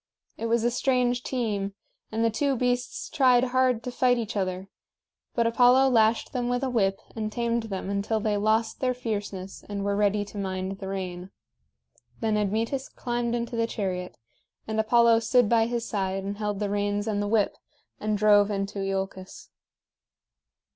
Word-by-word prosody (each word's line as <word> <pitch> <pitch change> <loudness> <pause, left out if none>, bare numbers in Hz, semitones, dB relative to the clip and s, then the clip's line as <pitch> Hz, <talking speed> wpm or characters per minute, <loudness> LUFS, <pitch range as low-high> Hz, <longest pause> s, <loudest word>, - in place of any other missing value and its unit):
It 230 - -3
was 230 0 +2
a 240 - +2
strange 250 -1 +1
team, 210 -7 -2 0.4
and 225 +1 0
the 230 - +2
two 275 +5 0
beasts 250 - -1
tried 255 -4 +4
hard 255 -2 +2
to 250 - -4
fight 245 0 +2
each 230 -1 -4
other; 185 -1 -2 0.7
but 235 - +2
Apollo 250 +3 +5
lashed 225 0 +2
them 245 -2 -1
with 245 +2 0
a 260 - 0
whip 195 -5 +1 0.2
and 215 -1 -3
tamed 235 0 -1
them 190 -1 -4
until 200 +2 0
they 215 0 0
lost 220 +2 +1
their 255 -1 0
fierceness 205 -5 -5
and 200 -1 -3
were 200 0 +1
ready 205 0 +1
to 205 0 -8
mind 190 0 -3
the 195 - -6
rein. 185 -1 -5 0.9
Then 220 -2 0
Admetus 225 +6 -1
climbed 240 -1 -2
into 235 0 -3
the 230 0 +1
chariot; 185 -5 -4 0.5
and 220 0 -1
Apollo 230 +1 +5
stood 230 +1 +3
by 225 0 +3
his 235 -1 -2
side 195 -2 -2
and 200 +1 -5
held 210 -2 -2
the 205 -1 -1
reins 205 0 0
and 205 -2 0
the 205 - -1
whip, 210 -1 +2 0.4
and 215 0 0
drove 205 0 +5
into 200 0 -3
Iolcus. 195 -1 -4
220 Hz, 175 wpm, -26 LUFS, 200-240 Hz, 0.9 s, Apollo